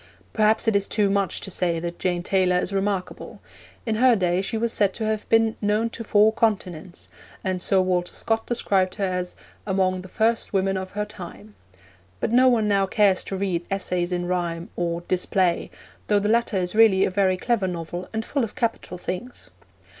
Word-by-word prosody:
Perhaps 220 +1 +2
it 220 - +3
is 200 0 +2
too 205 -2 +1
much 200 -2 0
to 195 - -6
say 175 -2 0
that 170 +1 -5
Jane 175 -1 -1
Taylor 185 -1 +2
is 180 - -2
remarkable. 195 -1 -3 0.5
In 220 -2 -1
her 250 0 +5
day 180 -2 +1
she 225 +3 -3
was 230 +1 0
said 200 -2 +1
to 225 - -3
have 215 -1 -2
been 225 -1 +3
'known 215 +2 +1
to 230 - -7
four 215 0 +4
continents,' 190 -6 -2 0.4
and 185 -1 -2
Sir 190 +1 +3
Walter 180 -1 -1
Scott 225 0 -1
described 195 -6 +1
her 205 - -3
as 180 -1 -2 0.3
'among 185 -1 +1
the 185 - -11
first 225 +4 0
women 195 0 +1
of 190 0 -4
her 210 0 -2
time'; 110 - -11 0.7
but - - -1
no 255 +2 +5
one 230 -4 +3
now 200 -1 +2
cares 200 -2 +3
to 195 - -4
read 185 -3 -1
Essays 180 -2 -1
in 175 0 -1
Rhyme, 175 -1 -3
or 170 -1 -2
Display, 180 0 0 0.4
though 210 - +3
the 205 0 0
latter 230 -2 +2
is 180 -1 -2
really 215 -3 +5
a - - -2
very 185 -1 +2
clever 210 0 0
novel 175 0 -5
and 220 0 -3
full 280 -3 -1
of 220 - -5
capital 230 -7 -2
things. 225 +8 -7
195 Hz, 195 wpm, -24 LUFS, 180-220 Hz, 0.7 s, her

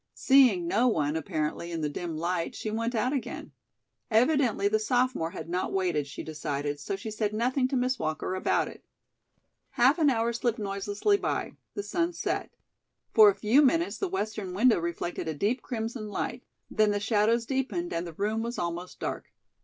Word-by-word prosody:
Seeing 250 -11 +5
no 230 +8 +3
one, 150 -9 +1
apparently, 160 +2 -2
in 165 -1 -3
the 150 - 0
dim 160 +2 -4
light, 170 +1 -2
she 215 - -4
went 230 +2 -1
out 245 +5 +1
again. 270 - -4 0.6
Evidently 240 -3 +3
the 215 +1 +2
sophomore 245 -5 +1
had 165 -1 -7
not 180 +2 -2
waited, 175 -7 0
she 135 - -7
decided, 145 -2 -3
so 170 +7 -3
she 215 +3 -6
said 210 -1 -1
nothing 255 +3 +1
to 270 - -2
Miss 255 0 0
Walker 155 +3 -2
about 185 - +1
it. - - -11 0.9
Half 265 +7 +3
an 305 -3 +5
hour 235 -2 +1
slipped 235 0 0
noiselessly 205 - 0
by; - - -2 0.2
the 205 - -3
sun 335 - -1
set. - - -2 0.6
For 430 -2 +9
a 395 - +1
few 230 +7 +4
minutes 330 +5 +2
the 390 - -1
western 215 - -3
window 230 0 +4
reflected 170 0 -3
a 160 - -2
deep 220 - 0
crimson 225 -1 -4
light; - - -3 0.3
then 215 -1 +3
the 205 0 0
shadows 220 +2 +2
deepened 270 +7 -2
and 170 +1 -2
the 170 - -8
room 210 +5 -1
was 235 +1 -4
almost 175 +1 -4
dark. - - -4
215 Hz, 185 wpm, -28 LUFS, 175-250 Hz, 0.9 s, For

